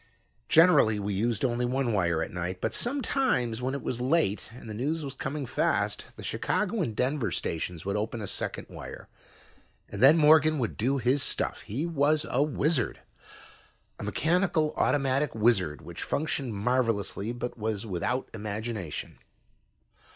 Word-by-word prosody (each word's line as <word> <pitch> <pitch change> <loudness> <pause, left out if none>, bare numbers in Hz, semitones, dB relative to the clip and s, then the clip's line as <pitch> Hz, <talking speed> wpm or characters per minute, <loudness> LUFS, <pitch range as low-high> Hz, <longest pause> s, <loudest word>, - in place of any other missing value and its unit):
Generally, 160 -10 +6
we 100 0 -2
used 115 +4 0
only 120 -1 0
one 125 -1 0
wire 85 -5 +1
at - - -6
night, 90 +1 -3
but 110 - -2
sometimes, 240 - 0
when 130 +2 -1
it 140 - -5
was 120 -1 -2
late 130 - +1
and 115 -1 -11
the 110 - -5
news 145 +8 -2
was 135 - -5
coming 140 +1 -4
fast, - - 0
the - - -10
Chicago 215 +1 -1
and 115 -10 -2
Denver 130 +1 0
stations 85 0 -3
would 100 +1 -1
open 110 +3 -2
a 105 - -4
second - - -4
wire, - - -9 0.8
and 100 - -6
then 145 +5 +8
Morgan 155 0 +6
would 120 -5 -2
do 130 +5 +1
his 130 +2 +2
stuff. - - 0
He 130 +10 -3
was 155 -2 +2
a 130 - +2
wizard, 150 -2 0 1.0
a - - -5
mechanical 165 -2 +1
automatic 135 -1 +1
wizard 100 -9 +2
which - - -8
functioned 140 -6 -2
marvelously 115 -2 0
but 120 0 -5
was 110 -2 -3
without 110 +6 -2
imagination. 105 -4 -5
125 Hz, 155 wpm, -28 LUFS, 105-150 Hz, 1.0 s, then